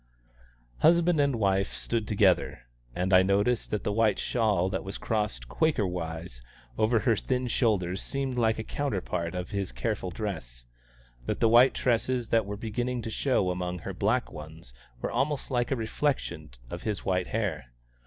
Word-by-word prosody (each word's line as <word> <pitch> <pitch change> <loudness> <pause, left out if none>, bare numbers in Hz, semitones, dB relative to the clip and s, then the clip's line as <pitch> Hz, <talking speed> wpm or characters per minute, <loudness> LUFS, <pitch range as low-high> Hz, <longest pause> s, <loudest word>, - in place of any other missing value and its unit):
Husband 170 0 +4
and 140 -2 +3
wife 100 -2 +1
stood 115 -2 -2
together, 100 - +2 0.3
and 95 +2 0
I 95 - +8
noticed 100 +5 +1
that 105 - -2
the - - 0
white 110 -1 +2
shawl 105 -7 +1
that 95 -1 -3
was 95 - -6
crossed 105 - -2
Quakerwise 90 - -1 0.3
over 110 +1 +2
her 115 -4 +3
thin 125 +4 -1
shoulders 100 -7 +1
seemed 135 -2 -3
like 110 -2 +2
a 110 - -3
counterpart 95 -11 -2
of 90 +2 -4
his 100 -2 -2
careful 105 -5 -2
dress, 80 - -5 0.6
that - - -1
the 115 - +4
white 120 +3 +6
tresses 120 0 0
that 115 -3 +2
were 100 0 -4
beginning 120 +3 -2
to 115 - -4
show 110 -6 +1
among 90 0 -3
her - - -6
black - - 0
ones 75 -3 -10 0.3
were - - -1
almost 145 -1 -1
like 120 -1 +1
a 135 - +1
reflection 115 - -2 0.2
of 85 - -5
his 105 -3 -3
white 90 -1 +1
hair. 95 - -2
105 Hz, 165 wpm, -28 LUFS, 90-120 Hz, 0.6 s, I